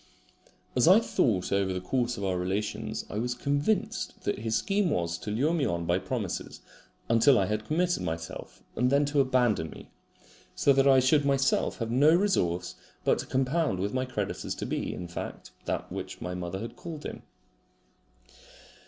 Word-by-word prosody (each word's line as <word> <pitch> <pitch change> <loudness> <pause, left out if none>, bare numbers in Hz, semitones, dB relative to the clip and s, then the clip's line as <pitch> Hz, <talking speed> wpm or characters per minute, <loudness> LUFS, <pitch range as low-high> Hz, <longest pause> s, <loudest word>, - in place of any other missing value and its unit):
As 125 +4 +4
I 190 +5 +8
thought 105 - 0
over 100 -1 +1
the 90 - -2
course 120 +5 -1
of 100 - -5
our 95 -1 0
relations 95 +4 -2
I 105 - -4
was 125 +2 -1
convinced 145 - -1
that - - -1
his 110 0 -1
scheme 200 - +1
was 85 - -1
to - - -6
lure 135 +10 +1
me 165 -4 +1
on 85 -8 -1
by 85 +2 +2
promises 100 0 -4 0.5
until 115 +4 +5
I 95 - +3
had 105 +2 -2
committed 175 +3 +1
myself, 80 0 -6
and 125 +2 +2
then 140 +2 +3
to 145 0 0
abandon 125 -10 +2
me, - - -12 0.6
so 140 - +4
that 135 0 +4
I 135 -1 +6
should 145 +3 +4
myself 140 -1 +1
have 115 -2 -3
no 145 +6 +5
resource 130 - +1 0.3
but - - +2
to - - -5
compound 135 - +1
with 100 +2 -2
my 130 0 0
creditors 105 -6 -3
to - - -4
be, - - -2
in 90 - -6
fact, 85 - -7
that - - -3
which - - -6
my 90 - -4
mother 90 +1 -4
had 115 +1 -6
called 160 0 -8
him. - - -6
120 Hz, 180 wpm, -28 LUFS, 95-140 Hz, 0.6 s, I